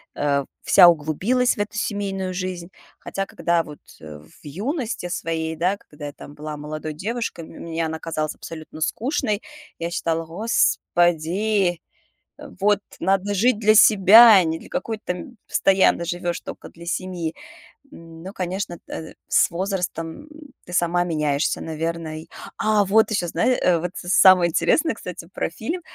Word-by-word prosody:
э, 140 -2 0 0.2
вся 180 -3 +7
углубилась 175 - +2
в - - -9
эту 210 0 -3
семейную 195 -3 -2
жизнь. 180 -1 -5 0.3
Хотя 195 0 -4
когда 170 -1 0
вот, 150 -2 -11 0.2
э, 75 -1 -9
в 75 +1 -20
юности 215 - -4
своей, 160 -2 -3
да, 180 +5 0
когда 150 -5 -10
я 145 - -8
там 145 - -12
была 150 0 -7
молодой 155 +1 -6
девушкой, 215 0 -4
мне 165 0 -5
она 160 0 -4
казалась 155 -2 -3
абсолютно 155 -1 -10
скучной, 220 - -1 0.3
я 170 0 -4
считала: 165 -2 -1
"Господи, 175 -1 +1 0.8
вот 205 0 +3 0.2
надо 195 +1 0
жить 220 +2 +2
для 215 0 +4
себя, 215 +2 +8
а 185 - +5
не 160 0 -1
для - - -14
какой-то 225 -5 -4
там" 180 +6 -5
Постоянно 190 -2 +3
живешь 175 0 -3
токо - - -9
для 170 0 -14
семьи. 175 -3 -3 0.6
Но, 165 +3 -11
конечно, 185 0 -3
эдэ 160 - -8
с - - +3
возрастом 180 - -4 0.4
ты 180 - -11
сама 175 0 +2
меняешься, 150 -2 0
наверно 160 0 -4
и. - - -14 0.3
А, 215 -1 +3
вот 220 +4 +3
еще, 180 -5 -1
знае 245 +10 +1
э, 175 -2 +3
вот 180 +2 -4
самое 180 -1 +5
интересное, 230 - +2
кстати, 180 -2 -8
про - - -2
фильм. 320 - -4
175 Hz, 150 wpm, -22 LUFS, 160-205 Hz, 0.8 s, себя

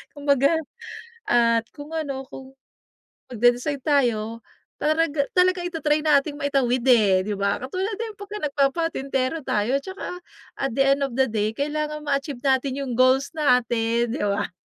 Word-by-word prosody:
Kumbaga 280 0 +2 0.8
at 230 -1 +3
kung 295 +1 -10
ano 280 -4 -3
kung, 265 0 -11 0.8
magde-decide 245 +5 +1
tayo 230 -6 +1 0.4
taraga 310 -1 +1
talagang 365 -1 +3
ita-try 305 -2 0
nating 290 -1 +2
maitawid 270 -4 +1
eh, 200 -6 +5
di 210 +1 -2
ba? 200 0 +1
Katulad 370 +11 -3
din 450 -2 -5
pagka 405 +1 -7
nagpapatintero 275 -1 0
tayo 220 +6 +1
tsaka 375 +2 -7 0.4
at 270 - -1
the 270 - +4
end 280 - -7
of 260 - -9
the 265 0 +3
day 215 0 -1
kailangan 300 +1 -2
ma-achieve 275 -3 -2
natin 265 0 +1
'yung 265 -3 -4
goals 260 +2 +4
natin 240 -4 +1
di - - -4
ba? 200 0 -1
275 Hz, 145 wpm, -23 LUFS, 240-300 Hz, 0.8 s, eh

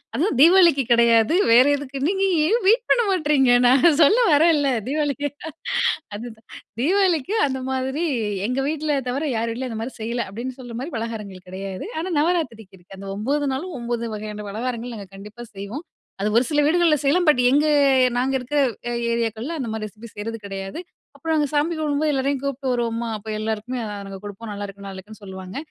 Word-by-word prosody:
அதுவும் 320 - +1
தீபாவளிக்கு 335 -4 +6
கெடையாது. 235 +3 +4 0.2
வேற 250 +2 +7
"எதுக்கு 275 -1 -7
நீங்க 390 0 0 0.2
ஏன் 465 +6 +2
வெயிட் 460 +4 +5
பண்ண 485 - +5
மாட்றீங்க?" 295 -8 +3 0.2
நான் 275 +5 +5
சொல்ல 420 - +5
வரேன்ல 295 -2 +4 0.2
தீபாவளிக்கு 290 0 -1 0.9
அதுதான் 225 +1 -9 0.3
தீபாவளிக்கு 365 - +2
அந்த 265 -1 -3
மாதிரி 265 +5 -1 0.4
எங்க 250 +2 -1
வீட்ல 305 -2 -1
தவிர 270 +5 -2
யார் 230 +1 -1
வீட்டிலும் 250 +2 -4
அந்த 220 -1 -4
மாதிரி 255 - -7
செய்யல. 235 +2 -2
அப்டின்னு 245 +6 -6
சொல்ற 245 -2 -8
மாதிரி 295 +4 -6
பலகாரங்கள் 210 -5 -6
கெடையாது. 190 0 -6
ஆனா, 350 +4 -3
நவராத்திரிக்கு 245 - -1
இருக்கு. 185 +2 -14
அந்த 195 - -8
9 280 +7 -1
நாளும் 315 +4 -5
9 235 0 -2
வகையான 210 0 -6
பலகாரங்கள் 240 +1 -4
நாங்க 200 -2 -9
கண்டிப்பா 210 +4 -10
செய்வோம். 205 - -7 0.4
அது 210 - +1
ஒரு 240 - +5
சில 295 -1 +2
வீடுகள்ல 330 0 +4
செய்யலாம். 320 +5 +2
பட் 295 -4 +5
எங்க 290 +4 +3 0.5
நாங்க 260 +2 0
இருக்கிற 255 +3 -3 0.5
ஏரியாக்கள்ல 230 +5 -2
அந்த 255 - -3
மாதிரி 220 -1 -4
ரெசிபி 215 +3 -12
செய்றது 225 +2 -5
கிடையாது. 195 +5 -6 0.4
அப்புறம் 325 -1 -2
நாங்க 300 -1 +2
சாமி 300 +3 +1
கும்பிடும்போது, 305 0 0
எல்லோரையும் 270 0 0
கூப்பிட்டு 275 -1 -2
வருவோமா, 235 -1 -2
அப்போ 215 +1 -10
எல்லாருக்குமே 220 +3 -3 0.3
நாங்க 195 0 -7
குடுப்போம். 205 +2 -8
"நல்லாயிருக்கு 200 -1 -7
நல்லாயிருக்குன்னு 195 +3 -10
சொல்லுவாங்க" 190 0 -8
250 Hz, 170 wpm, -22 LUFS, 220-295 Hz, 0.9 s, வேற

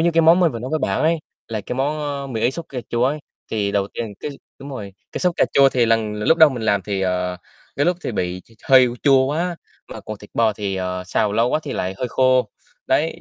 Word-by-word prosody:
Giống - - +2
như 170 - +4
cái 165 - +5
món 165 +3 +6
mình 170 -4 +3
vừa 115 - -4
nói 125 +3 -6
với 155 - +1
bạn 100 -9 -1
ấy, 165 +1 +2 0.3
là 110 -2 -3
cái 105 - -5
món, 145 +3 0 0.3
a, 130 - -7
mì 110 - -2
Ý 120 - +3
sốt 165 +4 -5
cà 130 - -5
chua 120 +1 +1
ấy. 145 +4 0 0.3
Thì 100 -2 -1
đầu 100 -1 0
tiên 110 -3 -4
cái 150 - -4 0.3
đúng 140 - -9
rồi, 105 -7 -7 0.2
cái - - -4
sốt 180 -2 +1
cà - - +4
chua 140 -1 +6
thì 125 -3 +2
lần 110 -2 +1
l 105 - -5
lúc 165 - +5
đầu 160 - +9
mình 125 -4 -5
làm 100 -3 +1
thì, 100 0 -3
ờ, 90 -1 -1 0.4
cái 145 - +1
lúc 180 0 +2
thì - - -3
bị 90 -2 -2
t - - -21 0.2
hơi 130 -2 +7
chua 135 -2 +5
quá, 170 +5 -1 0.3
mà - - -8
còn 110 -1 -7
thịt 105 - -14
bò 115 -2 +3
thì, 100 -2 -3
ờ, 90 0 -3
xào 105 +2 0
lâu 115 +3 +2
quá 155 - +1
thì 145 - -5
lại 95 +1 -2
hơi 125 - -2
khô, 130 -2 +2 0.4
đấy. 165 +2 +1
120 Hz, 275 wpm, -21 LUFS, 105-145 Hz, 0.4 s, đầu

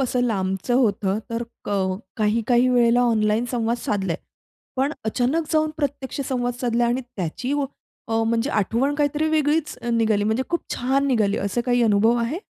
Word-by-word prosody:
असं 250 -1 0
लांबचं 195 0 -1
होतं 210 -5 +2
तर 230 +1 -2 0.2
कळ 190 -2 0 0.2
काही-काही 230 +3 +2
वेळेला 240 -1 +4
ऑनलाईन 220 -1 +2
संवाद 235 -1 0
साधलाय. 195 -7 -1 0.6
पण 275 +3 +1
अचानक 255 +8 0
जाऊन 310 0 +2
प्रत्यक्ष 285 -2 -3
संवाद 245 -2 -1
साधला 240 -1 +1
आणि 240 +2 0
त्याची 245 - -4 0.6
अ, 225 0 +1
म्हणजे 230 +4 0
आठवण 230 +7 +1
काहीतरी 295 +1 +1
वेगळीच 310 0 +1 0.2
निघाली 220 -3 +2
म्हणजे 220 +4 +1
खूप 340 - 0
छान 270 +3 +1
निघाली, 215 -6 +2
असं 200 +4 -1
काही 245 -1 +3
अनुभव 220 +2 +4
आहे? 300 - -3
240 Hz, 155 wpm, -23 LUFS, 215-265 Hz, 0.6 s, वेळेला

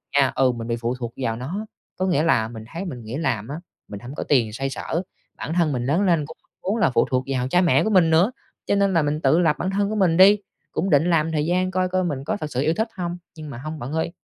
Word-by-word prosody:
nha, 135 -2 +4
ừ, 130 -1 +3
mình 115 -1 -6
bị 115 - 0
phụ 120 +2 -2
thuộc 120 -2 -6
vào 115 -4 -1
nó, 170 - -5 0.3
có 185 - 0
nghĩa 160 -5 +2
là 110 -9 +2
mình 110 -1 -9
thấy 180 +4 -4
mình 125 -9 -6
nghỉ 110 +4 -6
làm 125 -9 -1
á, 145 - -5 0.3
mình 100 - -7
hổng 125 +4 -9
có - - -3
tiền 115 -7 +2
xoay 135 +3 -2
sở, 160 +6 -3 0.4
bản 160 - -4
thân 170 -4 +2
mình 125 -2 -2
lớn 155 +8 +2
lên 170 -6 +2
cũng 160 - -11 0.3
muốn 205 +5 0
là 175 -9 +3
phụ - - +2
thuộc 130 0 +1
vào 130 -2 -1
cha 180 +6 +3
mẹ 155 -7 +4
của 220 - 0
mình 180 -5 +4
nữa. 175 +9 +4 0.3
Cho 200 - +1
nên 200 -1 +2
là 165 - +4
mình 150 +2 -1
tự 145 +5 +4
lập 160 -4 +3
bản 185 - -1
thân 200 +1 0
của 215 - -2
mình 180 -5 +3
đi, 200 +2 +8 0.3
cũng 195 - -1
định 155 +3 +3
làm 160 -1 +2
thời 150 -1 0
gian 185 +2 +1
coi 185 0 +1
coi 185 0 +1
mình 140 -6 -3
có - - -2
thực 155 -1 -6
sự 125 - -1
yêu 155 +3 +2
thích 220 +4 -1
hông. 175 -1 -3 0.2
Nhưng 155 -1 -8
mà 120 - -7
hông 155 +4 -6
bạn 125 +4 -6
ơi, 160 +1 -1
155 Hz, 290 wpm, -23 LUFS, 130-180 Hz, 0.4 s, đi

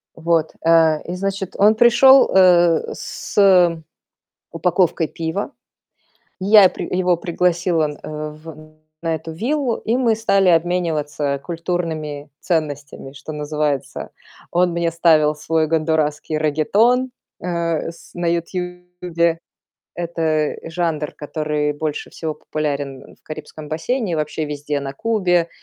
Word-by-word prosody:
Вот. 165 -1 0
Э, 160 -2 +4
и, 175 - -5
значит, 195 0 -3
он 210 +2 +5
пришел, 245 +4 +6
э, 175 -3 +4
с 180 -5 +2 0.7
упаковкой 170 -1 +1
пива. 165 - -4 0.9
Я 200 0 +7
при - - -6
его 180 -2 +2
пригласила, 170 -2 0
э, 155 0 -5
в 155 0 -13 0.3
на 165 -1 -1
эту 160 +1 -8
виллу, 250 - -1
и 230 +3 -1
мы 235 -4 +2
стали 200 -4 +2
обмениваться 160 -4 0
культурными 160 -4 -4
ценностями, 145 -5 -3
что 140 +2 -9
называется. 150 -2 -3 0.4
Он 175 0 +2
мне 170 -1 -1
ставил 155 -3 +3
свой 160 +1 0
гондурасский 155 -1 0
реггетон, 210 - +2 0.3
э, 170 -2 -2
с 170 - -17
на 175 -1 -3
"Ютубе". 180 -1 -2 0.6
Это 160 -3 -1
жанр, 160 -3 -2
который 150 0 -2
больше 150 0 -4
всего 160 -2 -5
популярен 140 -3 -4
в - - -37
Карибском 155 0 -9
бассейне 190 +6 -2
и - - +1
вообще 155 0 -2
везде 145 0 -3
на 135 0 -6
Кубе, 180 -5 +1
165 Hz, 120 wpm, -20 LUFS, 155-180 Hz, 0.9 s, Я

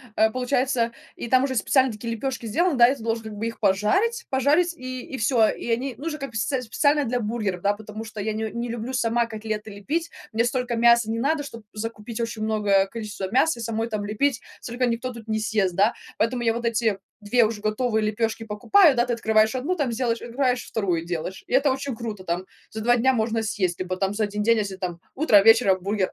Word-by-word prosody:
э, 220 0 +4
получается, 250 -1 0 0.2
и - - -6
там 255 +2 +4
уже 260 -1 -3
специальные 260 +2 +2
такие 230 +2 -4
лепешки 255 0 -4
сделаны, 335 - +1
да, 240 -1 +7
и 275 - 0
ты 240 - -13
должен 225 0 -2
как 220 - -7
бы 215 +2 -3
их 230 - -7
пожарить 380 - +1
пожарить 300 +7 +2
и 255 0 -6
и 265 - -7
всё, 225 -1 +3
и - - -5
они, 255 +3 -1
ну, 290 - -9
уже 305 -2 -3
как 275 - -5
бы 230 - -15
сц 225 +6 -1
с 255 -1 0
специально 290 +5 +2
для 245 0 -1
бургеров, 210 -5 -2
да, 205 +2 +2
потому 215 +1 -8
что 220 -2 -7
я 220 +1 -2
н 215 - -4 0.2
не 240 0 -3
люблю 235 +2 -4
сама 235 -1 +1
котлеты 215 -1 -5
лепить, 305 +12 -3 0.2
мне 225 +1 +1
столько 250 -1 -1
мяса 235 -1 +4
не 225 - -1
надо, 295 +4 +1
чтоб 230 -5 -9
закупить 225 +1 -5
очень 230 -2 -3
многое 205 -3 +2
количество 210 -2 -6
мяса 265 0 +2
и - - -5
самой 225 0 -2
там 210 -2 -3
лепить, 250 +5 0 0.2
столько 245 +1 -2
никто 245 +2 -2
тут 230 -2 -11
не 220 0 0
съест, 205 -4 0
да, 205 +5 +3 0.3
поэтому 240 +2 0
я 225 - +2
вот 235 +1 -4
эти 220 -3 +1 0.2
2 220 +3 +3
уже 215 -1 -3
готовые 215 +1 0
лепёшки 225 +1 -1
покупаю, 275 - +4
да, 240 - +3
ты 245 - -1
открываешь 220 +1 +2
1, 290 +9 -1
там 285 -8 -1
сделаешь, 235 -1 -1
открываешь 250 +1 -1
2, 180 -6 -1
делаешь, 175 +2 -4
и - - -6
это 270 +1 +4
очень 265 -2 -3
круто, 215 -5 -6
там 175 +2 -2 0.2
за 220 - -6
2 240 +2 +3
дня 260 +3 +3
можно 225 -1 0
съесть. 185 -5 -1
Либо 185 0 -2
там 195 +1 -1
за 215 +1 0
1 210 0 -3
день, 230 +1 +4
если 200 -2 -2
там 180 -2 -5 0.2
утро, 240 -9 +5
вечером 225 -3 +5
бургер, 195 0 0
230 Hz, 230 wpm, -24 LUFS, 215-255 Hz, 0.3 s, да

